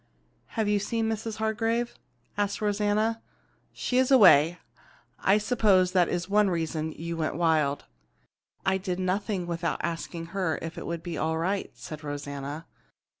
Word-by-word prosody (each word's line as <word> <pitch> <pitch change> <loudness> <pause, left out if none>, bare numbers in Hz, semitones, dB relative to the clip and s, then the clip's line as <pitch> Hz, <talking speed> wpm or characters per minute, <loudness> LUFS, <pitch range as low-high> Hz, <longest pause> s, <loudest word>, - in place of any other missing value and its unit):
"Have 220 -2 +1
you 205 0 +2
seen 225 +2 -1
Mrs. 220 0 -3
Hargrave?" 225 +2 0 0.4
asked 205 -1 -1
Rosanna. 210 +2 +1 0.5
"She 250 - 0
is 260 - +3
away. 175 - +7 0.6
I 195 +2 +4
suppose 205 -5 +3
that 180 -2 +3
is 175 0 -2
one 205 0 +3
reason 160 -2 -1
that 155 - -11
you 170 +1 -4
went 155 -3 -2
wild." 155 -4 +1 0.8
"I 190 0 +2
did 185 -1 -3
nothing 185 0 -1
without 170 -1 -2
asking 165 0 -4
her 185 -5 0
if 165 0 -6
it - - -6
would 170 -1 -4
be 175 -2 -4
all 160 +1 0
right," 190 +4 -1
said 150 +6 -9
Rosanna. 145 +1 -5
185 Hz, 155 wpm, -27 LUFS, 165-210 Hz, 0.8 s, away